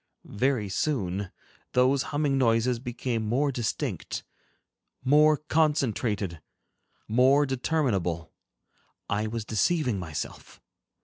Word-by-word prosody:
Very 120 -1 0
soon, 100 -5 -1 0.4
those 130 +2 +4
humming 145 -1 +1
noises 120 -1 +2
became 120 -1 -3
more 130 +7 +1
distinct, 120 -4 -3 0.8
more 150 +3 +5
concentrated, 125 - 0 0.7
more 130 +6 +4
determinable, 120 - -1 0.7
I 105 +2 -1
was 110 -1 -4
deceiving 125 - +1
myself. 80 -4 -6
125 Hz, 85 wpm, -27 LUFS, 105-140 Hz, 0.8 s, more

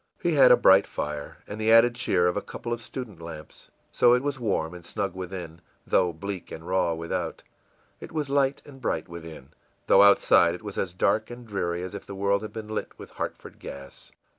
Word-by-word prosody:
He 175 - 0
had 135 -4 +7
a 125 - +8
bright 95 +1 +6
fire 75 -1 -5
and 105 +1 -7
the 110 +1 +3
added 115 +1 +7
cheer 105 -7 +1
of 90 - +1
a - - -1
couple 120 - -5
of 120 - -5
student 115 -8 -8
lamps. 80 -2 -10 0.2
So 120 0 +5
it 125 +1 +2
was 140 -2 -2
warm 95 -8 -1
and 90 -1 -10
snug 100 +2 -3
within, 90 -3 -7 0.2
though 90 - +2
bleak 95 +3 -7
and 80 +1 -8
raw 90 -3 +1
without; 85 +1 -4 0.6
it - - -10
was 155 -3 -2
light 140 0 +1
and 135 -2 -13
bright - - -2
within, 80 -5 -10 0.4
though 95 - +6
outside 95 -4 +5
it 100 - -12
was 105 -2 -5
as 90 -2 -3
dark 105 +3 +1
and 120 0 -9
dreary 90 -5 -2
as 90 - -6
if 100 - -8
the 100 - -7
world 100 +1 +1
had 110 - -7
been 110 -1 -7
lit 110 - -5
with - - -11
Hartford - - -6
gas. 70 0 -10
100 Hz, 215 wpm, -26 LUFS, 85-120 Hz, 0.6 s, a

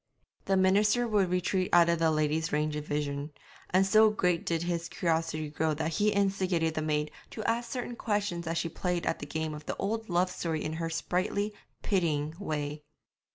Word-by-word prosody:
The 195 0 +2
minister 205 +5 +3
would 205 -4 +2
retreat 180 +1 0
out 170 -1 +6
of 170 -1 +2
the 165 -1 +3
lady's 155 +1 +1
range 150 0 0
of 150 0 -5
vision; 145 0 -2 0.4
and 185 +1 +4
so 215 +3 +6
great 180 -5 0
did 165 -1 0
his 170 -1 -2
curiosity 160 -2 -1
grow 155 0 0
that 160 +2 -2
he 210 +6 +2
instigated 190 -5 +1
the 155 - -2
maid 150 -1 0 0.2
to 220 - -6
ask 235 +1 0
certain 245 -1 -4
questions 205 -7 -1
as 165 +1 -1
she 165 - 0
played 175 +1 -2
at - - 0
the - - -6
game 160 -1 -3
of 150 0 -9
the - - -3
old 220 +2 -2
love 180 +1 +2
story 160 -4 -2
in 155 - -3
her 165 - -1
sprightly, 185 +5 -1 0.3
pitying 155 -6 0
way. 150 -5 -3
170 Hz, 195 wpm, -30 LUFS, 155-195 Hz, 0.4 s, out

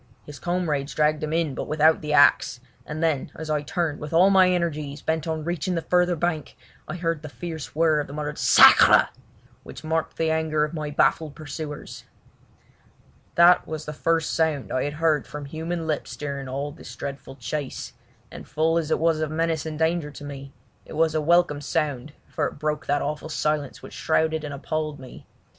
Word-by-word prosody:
His 150 - -10
comrades 160 -6 -2
dragged 150 0 +2
him 155 0 -3
in 160 -3 0
but - - -5
without 155 +1 +3
the 150 -1 -4
axe, 145 -4 +4 0.3
and 155 +2 -4
then 155 -5 0
as 160 0 -5
I 150 -1 +1
turned 155 0 -2
with 150 +2 -7
all 185 +4 +6
my 190 -1 +6
energies 155 -5 -2
bent 160 +1 -1
on 160 -1 -2
reaching 175 +2 -2
the 165 - -2
further 180 0 +2
bank, 160 -3 -2 0.3
I - - -5
heard 165 -3 -2
the 155 - -8
fierce 160 -1 -7
whirr 160 -1 +3
of 145 - -3
the 140 - -9
muttered 150 0 -4
"Sacre!" - - +7 0.5
which - - -11
marked 160 0 -2
the 160 -1 +1
anger 160 -1 +1
of 150 +2 -3
my 155 -2 -4
baffled 150 +1 +1
pursuers. 150 -1 -7 1.3
That 175 +1 +6
was 155 -1 -5
the 150 - -5
first 165 +1 0
sound 160 -4 0
I 130 - 0
had 145 - -3
heard 155 -1 +1
from 150 -1 -7
human 165 +3 -4
lips 155 -2 -3
during 140 -2 -5
all 140 +3 -3
this 145 - -11
dreadful 140 -1 -7
chase, 135 +3 -5 0.4
and - - -10
full 165 +2 +1
as 160 -2 -4
it - - +2
was 165 -1 +2
of 155 -1 -1
menace 160 0 -1
and 155 -1 -5
danger 160 -1 0
to 145 - -11
me 140 -1 -8 0.3
it - - -12
was 160 0 +2
a 155 - +1
welcome 165 -2 +3
sound 145 -2 -2
for - - -1
it - - -9
broke 150 +1 -2
that 145 +1 +1
awful 150 +2 -4
silence 150 -3 -2
which - - -10
shrouded 160 0 0
and 150 - -5
appalled 150 +1 -3
me. 130 -1 -12
155 Hz, 195 wpm, -24 LUFS, 145-165 Hz, 1.3 s, Sacre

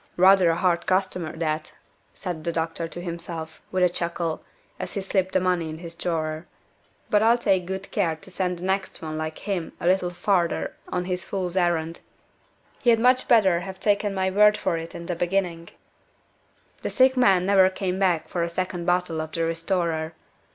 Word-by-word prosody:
"Rather 185 -1 +6
a 165 - +2
hard 170 -1 +1
customer 185 -3 0
that," 155 -1 -2 0.4
said 175 -5 -5
the 170 - -1
doctor 165 0 -2
to 175 - -8
himself, 170 -2 -6
with 185 -1 +1
a - - +7
chuckle, 170 -2 -3 0.4
as - - -5
he 200 - -2
slipped 190 -1 0
the - - +4
money 180 -3 0
in 155 - -6
his 170 0 -9
drawer. 160 -2 -3 0.6
"But 210 - +4
I'll 230 +2 +5
take 190 -6 +1
good 190 +1 -5
care 165 -3 +1
to 155 - -15
send 180 -2 -1
the 175 - -10
next 190 -1 -2
one 155 -1 -4
like 155 0 -4
him 190 -5 -3
a 175 - -5
little 180 0 +3
farther 175 0 0 0.2
on 180 -1 -1
his 180 0 -2
fool's 185 -2 -3
errand. 170 -2 0 0.8
He'd 235 -3 +5
much 255 +2 +4
better 195 -7 +5
have 190 +1 -7
taken 205 -1 +1
my 190 0 0
word 210 +2 +5
for - - 0
it 165 0 -6
in 170 - -7
the 175 - -2
beginning." 175 -1 -1 1.1
The - - -2
sick 260 0 +4
man 195 -8 +4
never 190 -1 +5
came 185 0 -3
back 180 -5 +1
for 175 - -2
a 170 - 0
second 175 0 -3
bottle 175 -2 +1
of 160 0 -7
the 165 - -1
"Restorer." 165 -1 -1
180 Hz, 190 wpm, -25 LUFS, 165-190 Hz, 1.1 s, a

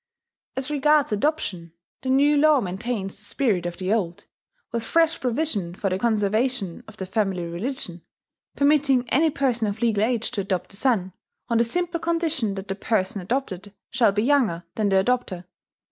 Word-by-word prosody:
As 265 +2 -2
regards 295 -1 +3
adoption, 205 - -1 0.3
the 260 - -4
new 285 +3 +4
law 300 0 +5
maintains 195 0 -3
the - - -13
spirit 205 -6 0
of 175 0 -6
the 190 +2 0
old, 180 -6 -2 0.5
with 235 - -1
fresh 330 +7 +2
provision 235 - -1
for 195 0 -2
the 185 - 0
conservation 215 -2 0
of 215 -1 -13
the 190 - -4
family 190 -2 -1
religion, 175 0 -4 0.5
permitting 280 -3 +3
any 315 +4 +4
person 255 -6 0
of 205 +3 -3
legal 215 -3 +2
age 235 0 0
to 220 -5 -1
adopt 190 -1 -3
a - - -9
son, 200 -6 0 0.4
on 230 -1 +2
the - - +5
simple 340 +7 -1
condition 325 - 0
that 195 0 -6
the 195 - -2
person 200 -1 -1
adopted 200 -2 -3 0.2
shall 230 -4 +4
be 210 +2 0
younger 235 -11 +2
than 210 -2 0
the 195 - +2
adopter. 205 -7 -1
225 Hz, 175 wpm, -24 LUFS, 195-270 Hz, 0.5 s, law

